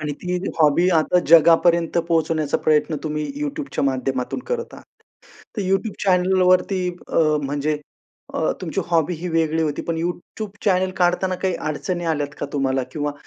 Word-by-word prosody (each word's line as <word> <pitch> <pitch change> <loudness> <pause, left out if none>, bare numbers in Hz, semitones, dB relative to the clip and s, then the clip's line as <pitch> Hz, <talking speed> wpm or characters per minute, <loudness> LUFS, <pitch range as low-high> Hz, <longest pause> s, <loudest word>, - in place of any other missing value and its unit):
आणि 150 -1 -3
ती 180 0 -1 0.2
हॉबी 155 +3 +4
आता 180 +3 +2
जगापर्यंत 170 +2 +5
पोहोचवण्याचा 160 -2 +1
प्रयत्न 155 0 +2
तुम्ही 150 -1 -2 0.2
YouTubeच्या 290 - -3
माध्यमातून 130 -1 -1
करत 475 -1 -3
आहात. - - -13 0.7
तर 205 - -1
YouTube 195 +3 0
चॅनेलवरती 185 0 +3 0.2
अ, - - 0 0.2
म्हणजे 145 +2 -1 0.6
अ, - - +1
तुमची - - -2
हॉबी 170 0 +1
ही 170 +3 -5
वेगळी 160 -1 +1
होती. 150 -2 -2
पण 165 -1 -3
YouTube 185 +4 -5
चॅनेल 185 -2 +2
काढताना 180 +1 +1
काही 185 -1 -1
अडचणी 175 +3 -3
आल्यात 145 -2 -1
का - - -2
तुम्हाला? 135 -2 0
किंवा 145 -1 -2
165 Hz, 150 wpm, -21 LUFS, 150-185 Hz, 0.7 s, जगापर्यंत